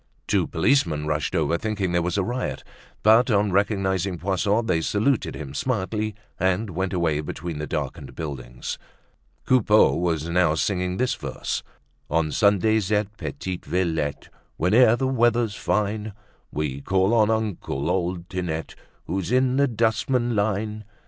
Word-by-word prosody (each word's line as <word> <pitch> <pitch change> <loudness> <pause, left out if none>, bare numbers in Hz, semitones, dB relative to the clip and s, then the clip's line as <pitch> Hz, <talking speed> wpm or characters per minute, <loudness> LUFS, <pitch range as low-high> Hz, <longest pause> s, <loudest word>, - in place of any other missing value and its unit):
Two - - +1
policemen 80 - +1
rushed 75 +4 -1
over, 80 0 +1
thinking 105 -4 -1
there 85 0 +2
was 90 +3 -1
a 100 - +2
riot, 120 +5 -3 0.4
but 115 +4 +6
on 105 -2 +2
recognizing 95 -2 +1
Poisson, 100 +5 0
they 85 -6 +1
saluted 110 - 0
him 70 -3 -7
smartly 110 - -2 0.2
and 95 +3 +1
went 95 +2 -2
away 85 -5 +1
between 80 +1 -5
the 75 - -4
darkened - - -4
buildings. 65 -6 -6 0.7
Coupeau 110 -4 +5
was 85 -3 -1
now 85 -2 +2
singing 90 +1 -1
this 130 0 +1
verse: - - -4 0.5
"On 80 0 +1
Sundays 105 +1 +2
at 105 0 0
Petite 90 +1 -5
Villette, 80 -5 -1 0.3
Whene'er 110 +7 +5
the 130 - -1
weather's 120 -3 +2
fine, 105 0 -1 0.4
We 70 -2 -3
call 95 +6 +2
on 110 -2 +4
uncle, 105 -11 -2
old 90 -1 -2
Tinette, 85 -4 -4 0.3
Who's 95 +2 -3
in 130 0 +3
the 140 0 +4
dustman 120 +1 +1
line. 105 +1 -1
95 Hz, 140 wpm, -24 LUFS, 85-110 Hz, 0.7 s, but